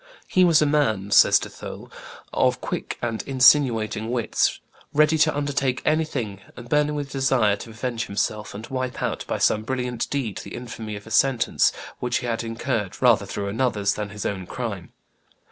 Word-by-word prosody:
"He 185 - +3
was 165 -4 +5
a - - +3
man," 110 -10 +1
says - - +7
De - - -4
Thou, - - -9 0.5
"of - - +2
quick - - -4
and 115 -2 -1
insinuating 120 -5 +4
wits, 120 -2 0 0.4
ready 155 +1 +4
to 150 -1 +3
undertake 140 -3 0
anything, 135 -11 -1 0.2
and 120 - -9
burning 150 +2 +1
with 145 -2 -4
desire 130 -6 +2
to 115 - -9
avenge 115 +1 -4
himself, 100 +1 -2
and 110 +2 -7
wipe 130 -1 -4
out, - - -2
by - - -1
some 110 - +2
brilliant 125 0 -3
deed, 125 -8 -2
the - - -8
infamy 115 -3 -6
of 105 - -9
a 115 - -12
sentence 125 0 +3 0.3
which 125 0 0
he - - -5
had 115 -1 -2
incurred 115 -3 -3
rather - - +4
through 100 - -4
another's 105 -3 0
than 105 -1 -4
his 105 +1 -7
own 95 -3 -3
crime. 105 -8 -5
120 Hz, 180 wpm, -24 LUFS, 110-135 Hz, 0.5 s, says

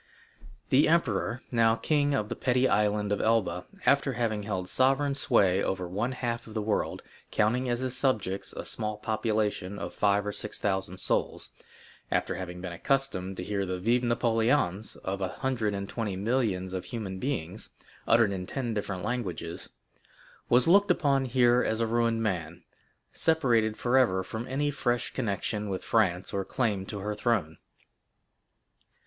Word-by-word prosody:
The 135 +3 +5
emperor, 125 -6 +1
now 115 -2 +4
king 145 +2 +1
of 105 -5 -1
the - - -4
petty 130 0 +2
Island 105 -1 +1
of 105 - +1
Elba, 95 -6 +1 0.2
after 140 -1 +3
having 110 -3 -1
held 95 -3 -3
sovereign 135 +4 +2
sway 100 -8 +3
over 95 -1 -2
one 105 +8 -2
half 120 -2 -3
of 110 - -11
the 110 - 0
world, 105 0 -1 0.3
counting 120 +4 +1
as 120 +1 0
his 130 -1 -1
subjects 105 -8 0
a - - -7
small 105 -1 -2
population 105 -3 -1
of - - -5
five 100 0 +2
or 105 - -1
six 105 - -2
thousand 95 -2 -1
souls,—after - - -3
having 90 -1 -6
been 90 -2 -5
accustomed 95 -4 -1
to - - -4
hear 100 +1 -1
the 90 -1 -3
"Vive 120 +6 +2
Napoléons" 115 -3 +1
of 95 +1 -3
a 95 - +1
hundred 115 -3 -2
and 100 0 -4
twenty 105 -4 -3
millions 100 -3 0
of 95 -1 -4
human 100 -5 -5
beings, 110 - -4 0.4
uttered 115 -3 +5
in 90 -2 -4
ten 125 -4 -3
different 100 -3 -3
languages,—was 120 - -3
looked 200 +4 +5
upon 140 -6 +2
here 125 -1 +4
as 110 - 0
a 115 - +2
ruined 115 0 +1
man, 85 -4 -3 0.5
separated 120 -9 +2
forever 120 -7 +3
from 110 +6 -6
any 145 +2 0
fresh 125 -3 -1
connection 105 -2 -2
with 95 -1 -3
France 95 -5 +1
or 100 -1 0
claim 100 -5 -1
to 105 - -5
her 105 +2 -2
throne. 105 -8 -1
110 Hz, 155 wpm, -28 LUFS, 95-125 Hz, 0.5 s, The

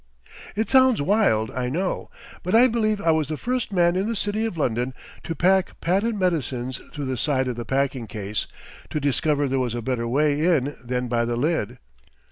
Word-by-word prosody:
It 220 +2 0
sounds 260 -2 +5
wild, 145 - +2
I 125 +1 -2
know, 180 +7 -2 0.3
but 180 +4 0
I 240 +2 +8
believe 220 -4 +1
I 165 -4 +2
was 160 -3 +1
the 155 0 -3
first 250 - -2
man 175 -2 +3
in 190 +3 0
the 230 - -1
city 205 +2 -1
of 185 - -6
London 125 -2 -1 0.3
to 165 - -4
pack 190 +2 +2
patent 200 +5 0
medicines 135 -8 -1
through 145 - -5
the 130 -1 -2
side 130 0 +1
of 125 - -2
the 120 0 -5
packing 135 -1 -1
case, 105 0 -3 0.4
to 150 - -2
discover 145 +1 +1
there 135 0 0
was 120 -2 -1
a 120 - -3
better 115 -1 -1
way 145 +4 +2
in 145 -5 +2
than 125 0 -2
by 120 -1 +1
the 120 0 -1
lid. 125 -3 -1
145 Hz, 200 wpm, -24 LUFS, 125-190 Hz, 0.4 s, I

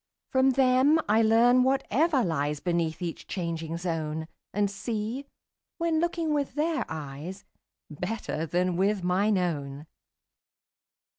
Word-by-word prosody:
From 260 0 +4
them 265 +3 +4
I 215 +2 +4
learn 235 +3 +5
whatever 270 +2 +2
lies 150 -4 -1
Beneath 170 0 -1
each 170 -2 -5
changing 165 -2 -3
zone, 160 -2 -3 0.2
And 205 0 0
see, 220 +6 -4 0.5
when 335 -2 +1
looking 335 -2 0
with 285 -2 -1
their 315 +2 0
eyes, 155 +5 -7 0.5
35 150 - -11
Better 180 -5 -3
than 180 +2 0
with 195 0 +1
mine 195 +3 +2
own. 145 -5 -2
200 Hz, 125 wpm, -27 LUFS, 165-260 Hz, 0.5 s, learn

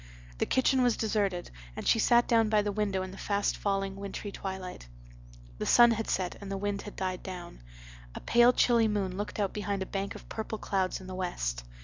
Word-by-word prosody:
The - - +1
kitchen 260 0 +3
was 245 -2 +3
deserted 200 -5 -1 0.2
and - - -5
she 225 - +4
sat 240 +2 +4
down 225 -2 +3
by 210 -1 +3
the 205 - -1
window 200 -2 -1
in 185 - -6
the 195 - -11
fast 200 0 0
falling 195 -1 -1
wintry 200 +1 -6
twilight. 190 - -6 0.7
The - - -2
sun 240 0 +7
had 225 -1 -2
set 185 -2 -1
and 200 -1 -7
the 195 - -2
wind 205 0 -2
had 205 - -9
died 185 -1 -3
down. 180 - -8 0.5
A - - -4
pale 240 +1 +5
chilly 235 -2 +4
moon 200 -3 -1
looked 205 +2 -4
out 200 -2 0
behind 200 -2 -2
a - - -7
bank 195 +1 -4
of - - -11
purple 220 0 -4
clouds 190 -2 -1
in - - -10
the 185 - -7
west. - - -3
200 Hz, 215 wpm, -30 LUFS, 190-215 Hz, 0.7 s, sun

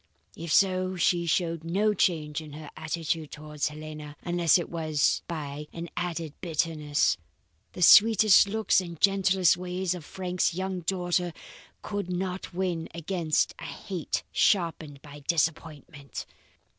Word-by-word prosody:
If 165 -1 -6
so, 185 0 +3
she 175 0 +1
showed 165 -1 0
no 200 +6 +1
change 160 -5 0
in 155 -2 -11
her 150 0 -9
attitude 160 -1 -3
towards 150 -1 -4
Helena, 150 0 -8
unless 175 -1 +3
it 175 - -3
was 155 -5 0
by 150 -3 -5
an 170 0 -6
added 165 -4 -3
bitterness. 155 -3 0 0.6
The 180 - -1
sweet 220 +4 +8 0.2
looks 215 -1 +2
and 170 -3 -8
gentle 195 -1 +2 0.2
ways 180 0 -2
of 180 -3 -7
Frank's 180 +1 -1
young 190 0 -3
daughter 175 -1 -1 0.5
could 205 -3 -4
not 180 +1 -3
win 175 -3 -2
against 170 -2 0
a - - -7
hate 185 -6 -4
sharpened 160 -7 +1
by 145 0 -11
disappointment. 150 -2 -3
170 Hz, 130 wpm, -27 LUFS, 155-185 Hz, 0.6 s, sweet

